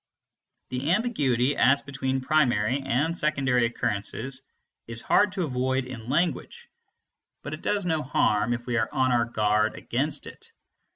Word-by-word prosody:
The 130 +4 -2
ambiguity 145 - +1
as 135 +2 +4
between 135 -1 -2
primary 130 -3 +2
and 135 +5 0
secondary 135 -7 +1
occurrences 120 +4 -2 0.5
is 115 0 -3
hard 205 - +3
to 190 -3 -1
avoid 130 -2 -1
in 120 -2 -8
language; 155 0 -1 0.8
but 145 - -6
it 155 - -7
does 205 -2 0
no 160 -3 0
harm 120 -5 +1
if 120 0 -5
we 120 -2 -1
are 115 - 0
on 130 -1 +1
our 120 -1 +3
guard 110 -1 +1
against 145 +4 -2
it. 460 +1 -11
130 Hz, 150 wpm, -26 LUFS, 120-150 Hz, 0.8 s, as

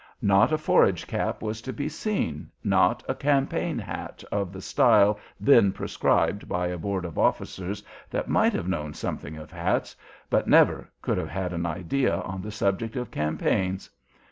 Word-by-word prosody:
Not 100 +6 +5
a 155 - +3
forage 155 - +3
cap - - -2
was 110 0 -3
to 130 - -5
be 145 +2 -3
seen, 155 - -3
not - - +3
a - - 0
"campaign 140 -1 0
hat" - - -6
of 100 -3 -1
the 95 - -8
style 105 +2 +4 0.2
then 115 -8 +6
prescribed 100 +1 0
by 90 0 0
a 90 - -3
board 95 0 -2
of 85 - -5
officers 95 +2 -1 0.3
that - - -2
might - - +3
have 85 - -2
known 75 -5 -3
something 80 +2 -5
of 75 0 -10
hats, 85 +2 -1 0.3
but - - +1
never - - +4
could - - 0
have 80 -3 -4
had 90 +2 -3
an 85 0 -2
idea 95 - 0
on 95 0 -5
the 105 - -6
subject 105 +1 -1
of 125 -1 -4
campaigns. 90 +5 -1
95 Hz, 170 wpm, -26 LUFS, 90-110 Hz, 0.3 s, then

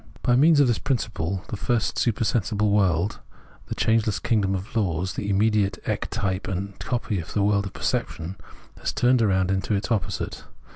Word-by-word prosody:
By 120 - +3
means 150 +3 +5
of 145 - +6
this 120 - +1
principle, 95 - -2
the - - -3
first 115 +2 0
supersensible 105 -2 +1
world, 95 -2 +2 0.5
the - - -4
changeless 110 -1 +2
kingdom 100 -5 +1
of 95 +4 -6
laws, 90 -4 0
the 100 - -3
immediate 105 0 +2
ectype 100 -3 -2
and 95 +1 -4
copy 115 -5 -2
of 80 - -7
the 105 - +2
world 100 -1 +2
of - - -9
perception, 85 +4 -2 0.4
has - - -2
turned 125 0 +3
round 95 -3 +2
into 95 +2 0
its 100 +5 -3
opposite. 110 -4 -2
100 Hz, 165 wpm, -25 LUFS, 95-115 Hz, 0.5 s, of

